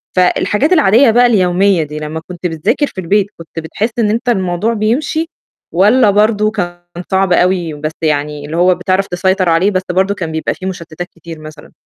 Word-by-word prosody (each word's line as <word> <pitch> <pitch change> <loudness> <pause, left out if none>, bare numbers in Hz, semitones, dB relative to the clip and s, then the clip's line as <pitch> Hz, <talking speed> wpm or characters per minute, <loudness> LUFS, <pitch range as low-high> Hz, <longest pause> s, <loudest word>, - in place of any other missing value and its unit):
فالحاجات 210 - +2
العادية 250 - +5
بقى 245 +2 +4
اليومية 190 -4 +2
دي، 150 0 -7
لمّا 155 +1 -5
كنت 180 0 -4
بتذاكر 175 - 0
في 190 - -7
البيت 195 +3 +1
كنت 165 -1 -12 0.2
بتحس 215 +8 -2
إن 215 -3 +2
أنت 235 +4 -1
الموضوع 190 0 0
بيمشي، 270 +9 -1 0.4
والّا 210 +6 +4
برضه 210 +1 +2
كان 175 -5 -4 0.3
صعب 190 -1 +2
أوي 175 -2 +1
بس 150 +1 -4
يعني 150 -1 -1
اللي 155 +3 -5
هو 180 +1 +4
بتعرف 185 +2 0
تسيطر 185 +1 0
عليه 170 +5 +3
بس 185 -1 -1
برضه 190 +2 +1
كان 165 -5 -4
بيبقى 160 0 -2
في 185 - -9
مُشتتات 175 -2 -6
كتير 165 -1 -10
مثلًا؟ 155 -1 -12
185 Hz, 180 wpm, -14 LUFS, 165-210 Hz, 0.4 s, العادية